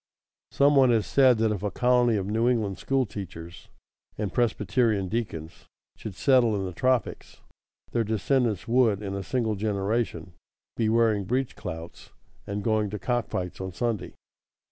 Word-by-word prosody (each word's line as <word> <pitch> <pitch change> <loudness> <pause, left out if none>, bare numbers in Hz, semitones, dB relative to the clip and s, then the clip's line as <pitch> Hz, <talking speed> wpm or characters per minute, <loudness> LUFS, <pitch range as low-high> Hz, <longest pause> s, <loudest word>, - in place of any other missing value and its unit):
Some 140 +1 +3
one 135 -2 +6
has 115 -3 +2
said 130 -3 +4
that 110 0 +1
if 105 -4 -3
a 105 - -1
colony 125 +2 +2
of 95 - -2
New 110 +4 +1
England 105 -7 -1
school 135 -1 +1
teachers 85 -5 -9 0.5
and 105 -4 -3
Presbyterian 110 -3 +1
deacons 85 -8 -5 0.3
should 105 -4 -8
settle 125 -2 +3
in 95 -1 -2
the 90 - -5
tropics, 130 +3 -1 0.5
their 115 - +1
descendants 110 0 0
would, 115 -4 +2
in 100 -1 -4
a 100 - -3
single 115 +1 -1
generation, 100 -3 -2 0.4
be 110 -2 +1
wearing 110 -3 +2
breech 130 +5 -1
clouts 80 +1 -8 0.4
and 100 0 -3
going 110 -1 +1
to 105 - -4
cock 120 +3 -1
fights 90 0 -4
on 95 -1 -5
Sunday. 115 +1 -3
110 Hz, 160 wpm, -26 LUFS, 100-120 Hz, 0.5 s, one